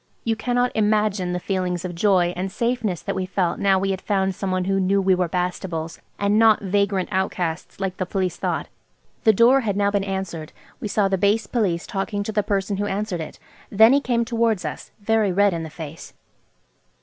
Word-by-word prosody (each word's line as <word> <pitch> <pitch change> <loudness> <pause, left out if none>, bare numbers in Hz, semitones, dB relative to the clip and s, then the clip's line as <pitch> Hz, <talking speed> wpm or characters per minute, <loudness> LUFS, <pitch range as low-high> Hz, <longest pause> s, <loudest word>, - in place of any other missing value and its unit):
You 225 -1 0
cannot 245 +2 0
imagine 210 -3 +1
the 180 - -2
feelings 180 -1 -2
of 180 - -4
joy 175 -1 +2
and 185 +2 -3
safeness 230 -5 -1
that - - -2
we 185 -1 -3
felt 185 -2 -1
now 195 -1 +3
we 195 +1 0
had 190 -1 -3
found 195 -2 0
someone 185 -1 -2
who 195 0 +1
knew 195 +1 +2
we 190 -1 +3
were 180 -2 0
Bastables, 180 -2 -3 0.2
and 205 +1 +2
not 225 -1 +6
vagrant 200 -1 0
outcasts 180 -3 -2
like 190 -1 -3
the 185 - -2
Police 185 -2 -1
thought. - - -2 0.6
The 220 - +8
door 240 +6 +5
had 205 -5 -1
now 200 0 +2
been 200 -1 0
answered. 190 -5 -4 0.3
We - - -4
saw 205 -1 +2
the 190 -1 0
base 205 +2 +2
Police 195 -7 -1
talking 205 +1 -3
to 220 - -4
the 210 0 +1
person 200 0 -1
who 205 +1 -1
answered 200 -3 -2
it. 155 - -8 0.3
Then 220 +4 +6
he 285 - +4
came 235 -3 0
towards 230 -6 0
us, 150 - -6
very 215 -1 +1
red 200 +1 +3
in 165 - -3
the 160 - -6
face. 160 0 -9
195 Hz, 205 wpm, -23 LUFS, 180-210 Hz, 0.6 s, The